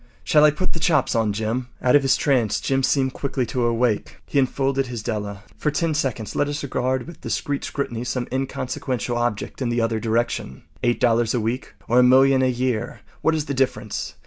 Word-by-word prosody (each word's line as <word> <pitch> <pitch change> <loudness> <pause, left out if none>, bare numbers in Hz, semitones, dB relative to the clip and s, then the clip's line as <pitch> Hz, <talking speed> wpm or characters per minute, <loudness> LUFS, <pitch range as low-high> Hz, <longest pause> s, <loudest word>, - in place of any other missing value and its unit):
Shall 150 -1 +4
I 150 - +8
put 155 +5 -2
the 165 - -4
chops 155 -1 +2
on, 110 -3 +1
Jim?” 110 +4 -2
Out 125 +2 +3
of 145 - +6
his 135 -1 +3
trance 125 -8 +1
Jim 135 0 0
seemed 130 0 +1
quickly 135 -2 -2
to 120 0 0
wake. 115 -2 0
He 140 - +1
enfolded 135 0 +1
his 120 -3 -5
Della. 105 -3 -4 0.2
For 150 - +1
ten 160 +2 0
seconds 130 -8 -2
let 145 - +1
us 145 0 -3
regard 130 -2 -1
with 170 -1 -12
discreet 140 -1 -2
scrutiny 120 -5 -3
some 125 0 -2
inconsequential 130 -2 -2
object 120 +1 -2
in 125 - 0
the 120 0 0
other 115 -1 0
direction. 115 - -1 0.2
Eight 120 0 +1
dollars 115 0 +2
a - - +1
week 115 +4 -3
or 120 +2 +4
a - - +7
million 130 +1 +5
a 130 - +3
year—what 125 +5 -2
is 155 -2 -1
the 140 - -3
difference? 125 -5 -2
125 Hz, 200 wpm, -23 LUFS, 115-135 Hz, 0.2 s, I